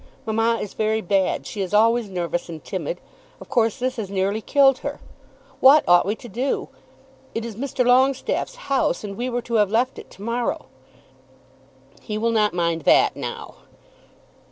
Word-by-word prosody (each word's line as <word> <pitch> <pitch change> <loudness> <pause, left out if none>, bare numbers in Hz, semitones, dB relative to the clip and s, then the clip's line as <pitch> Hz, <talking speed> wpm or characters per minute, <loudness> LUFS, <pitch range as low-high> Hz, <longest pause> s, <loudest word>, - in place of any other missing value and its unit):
Mamma 225 +1 +1
is 205 - -6
very 220 0 0
bad. 190 -1 0
She 205 - -5
is 190 +2 -2
always 225 0 +3
nervous 175 -2 -3
and 160 -2 -8
timid. - - -4 0.4
Of - - -13
course 225 -3 +1
this 255 +1 -2
has 210 -4 -4
nearly 200 +2 -1
killed 270 +2 +4
her. - - -5 0.6
What 280 +3 +7
ought 175 +1 +5
we 210 - 0
to 240 - -12
do? 245 +6 -2 0.7
It 225 0 -2
is 230 -3 -6
Mr. 255 +1 -1
Longestaffe's 265 - +2
house, 275 -4 0
and 200 -1 -6
we 245 +4 -3
were 245 -1 -2
to 235 - -7
have 205 - +1
left 245 +5 0
it - - -12
to 195 - -13
morrow." 235 +2 -2 1.4
"He 210 -2 -4
will 230 +2 +1
not 210 -4 +1
mind 170 -1 0
that - - +4
now." - - -7
225 Hz, 175 wpm, -22 LUFS, 200-245 Hz, 1.4 s, What